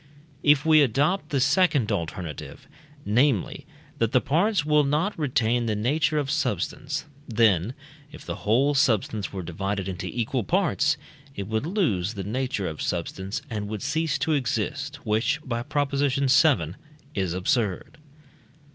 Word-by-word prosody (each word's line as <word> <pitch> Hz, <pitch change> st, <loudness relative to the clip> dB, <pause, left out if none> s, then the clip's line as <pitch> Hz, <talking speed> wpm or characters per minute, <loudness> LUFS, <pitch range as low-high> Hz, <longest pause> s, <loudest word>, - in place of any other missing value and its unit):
If 145 Hz, 0 st, +4 dB
we 155 Hz, -1 st, +6 dB
adopt 145 Hz, -, +1 dB
the 140 Hz, -, 0 dB
second 140 Hz, -, +3 dB
alternative 85 Hz, -2 st, -5 dB, 0.4 s
namely, 120 Hz, -, +1 dB, 0.3 s
that 115 Hz, +1 st, +1 dB
the 130 Hz, -, +6 dB
parts 175 Hz, -, +1 dB
will 150 Hz, -1 st, +4 dB
not 155 Hz, +9 st, 0 dB
retain 120 Hz, -5 st, +1 dB
the 110 Hz, -, 0 dB
nature 140 Hz, +8 st, +1 dB
of 145 Hz, -2 st, -1 dB
substance 145 Hz, -1 st, -2 dB, 0.2 s
then, 110 Hz, -2 st, +2 dB, 0.4 s
if 155 Hz, -, -12 dB
the 85 Hz, +2 st, -4 dB
whole 120 Hz, +9 st, +2 dB
substance 110 Hz, -6 st, +1 dB
were 95 Hz, -2 st, -5 dB
divided 95 Hz, +3 st, -3 dB
into 95 Hz, 0 st, -4 dB
equal 120 Hz, +3 st, -2 dB
parts, 160 Hz, -, +1 dB, 0.4 s
it 100 Hz, -, -4 dB
would 110 Hz, +6 st, -1 dB
lose 115 Hz, -, 0 dB
the 100 Hz, -, -4 dB
nature 115 Hz, -2 st, -2 dB
of 80 Hz, -2 st, -5 dB
substance, 95 Hz, +3 st, -3 dB
and 105 Hz, -2 st, -4 dB
would 105 Hz, +1 st, -5 dB
cease 155 Hz, +1 st, 0 dB
to 160 Hz, -, 0 dB
exist, 140 Hz, +2 st, -1 dB
which 115 Hz, +7 st, +1 dB
(by 120 Hz, -2 st, -2 dB
Prop. 145 Hz, +1 st, -1 dB
vii.) 140 Hz, -1 st, +1 dB, 0.9 s
is 95 Hz, -4 st, -1 dB
absurd. 95 Hz, +4 st, -1 dB
125 Hz, 145 wpm, -25 LUFS, 105-145 Hz, 0.9 s, we